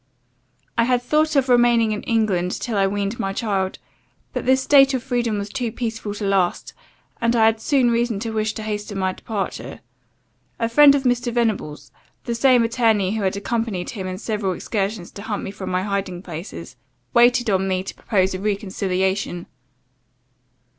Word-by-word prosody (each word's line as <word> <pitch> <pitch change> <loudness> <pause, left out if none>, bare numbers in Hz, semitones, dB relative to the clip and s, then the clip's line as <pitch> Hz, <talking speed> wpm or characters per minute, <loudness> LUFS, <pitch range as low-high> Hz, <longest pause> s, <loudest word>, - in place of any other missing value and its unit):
"I 230 - +5
had 250 0 +2
thought 310 +3 +1
of 270 -2 +3
remaining 240 -2 +4
in 210 - -2
England, 195 -6 0
till 235 - -3
I 195 -1 +3
weaned 200 +2 -2
my 195 0 -2
child; 195 -3 -1 0.6
but - - -4
this 260 0 +4
state 275 -1 +5
of 250 - -3
freedom 235 -3 -1
was 200 0 -4
too 245 -1 -3
peaceful 225 -3 -4
to 205 - -4
last, 195 -3 0 0.5
and 235 0 +2
I 225 -1 +5
had 220 0 +2
soon 260 -3 +2
reason 235 -3 0
to 225 0 -3
wish 215 0 -1
to 220 - -6
hasten 210 -1 -4
my 190 -1 0
departure. 205 -1 -5 0.8
A 230 - 0
friend 280 +4 +7
of 275 - -1
Mr. 245 -1 +1
Venables, 220 -11 -2 0.3
the 235 - -3
same 245 0 +4
attorney 225 -4 +1
who 220 - -2
had 190 0 0
accompanied 210 -3 -2
him 190 -4 -5
in 185 0 -4
several 210 -3 -2
excursions 195 -1 -3
to 200 - -9
hunt 210 -1 -4
me - - -5
from 190 -2 -7
my 185 0 0
hiding 195 -3 -3
places, 165 -6 -8 0.4
waited 240 0 +4
on 190 0 +1
me 185 -1 0
to 195 - -7
propose 190 -3 0
a 185 - -4
reconciliation. 190 -3 -1
215 Hz, 180 wpm, -22 LUFS, 195-235 Hz, 0.8 s, friend